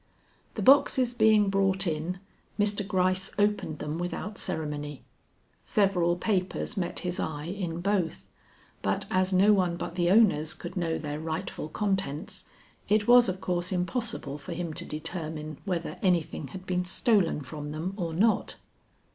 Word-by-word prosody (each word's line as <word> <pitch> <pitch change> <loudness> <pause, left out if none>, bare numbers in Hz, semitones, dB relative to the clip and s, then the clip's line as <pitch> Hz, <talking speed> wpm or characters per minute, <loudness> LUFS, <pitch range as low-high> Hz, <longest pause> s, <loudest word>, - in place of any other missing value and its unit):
The - - -2
boxes 260 -2 +5
being 215 -3 +4
brought 195 0 +2
in, 165 +2 -2 0.4
Mr. 205 0 +2
Gryce 185 -1 +1
opened 205 -6 +1
them 150 +3 -4
without 180 +4 -4
ceremony. 150 -4 -3 0.6
Several 180 -4 +2
papers 185 0 -1
met 180 -4 -2
his 180 -1 -2
eye 150 -1 -3
in 175 -2 -4
both, 190 -4 -1 0.6
but - - 0
as 185 0 +2
no 195 +3 +5
one 180 -4 +1
but 170 - -5
the 175 -1 +1
owners 185 -7 +4
could - - -8
know 165 -3 0
their 150 -1 -4
rightful 160 0 -4
contents, 190 -1 -2 0.4
it 210 0 +3
was 245 -2 +7
of 185 0 -3
course 180 0 -1
impossible 185 - -2
for 170 +5 -6
him 170 -1 -4
to - - -5
determine 155 -1 -4
whether 175 -4 -3
anything 170 -5 0
had 185 +8 -9
been 180 -1 0
stolen 185 -3 +1
from 145 +2 -7
them 160 +5 -3
or 175 -5 -3
not. 210 +7 +1
180 Hz, 150 wpm, -28 LUFS, 160-200 Hz, 0.6 s, was